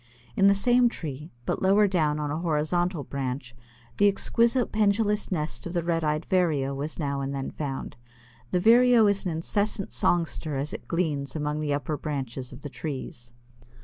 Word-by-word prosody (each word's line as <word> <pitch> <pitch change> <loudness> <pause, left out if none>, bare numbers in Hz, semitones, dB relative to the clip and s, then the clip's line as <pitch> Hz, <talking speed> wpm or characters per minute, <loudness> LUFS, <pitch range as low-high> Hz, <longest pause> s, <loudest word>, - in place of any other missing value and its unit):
In 195 - +5
the 200 - +6
same 245 +4 +4
tree, 150 - -7 0.2
but - - -1
lower 200 +2 +5
down 155 -6 +1
on 150 -1 -2
a 155 - -2
horizontal 170 +1 0
branch 130 -3 -4 0.4
the 205 - +5
exquisite 235 +4 +2
pendulous 210 0 +1
nest 150 -8 -3
of 170 - -6
the 170 -2 0
Red 165 -1 0
eyed 150 +1 0
Vireo 155 -7 +1
was 145 +3 -4
now 140 -3 -2
and 135 +1 -3
then 135 -1 -4
found. 135 -4 -5 0.5
This 180 +4 0
Vireo 240 0 +6
is 200 -1 +1
an - - -1
incessant 195 +5 -2
songster 165 -4 0
as 140 +2 -3
it - - -8
gleans 150 -6 -1
among 150 0 -2
the 150 -1 -1
upper 145 +1 -3
branches 135 -4 -4
of 130 +2 -11
the 145 - -5
trees. 130 -5 -6
155 Hz, 180 wpm, -26 LUFS, 140-195 Hz, 0.5 s, the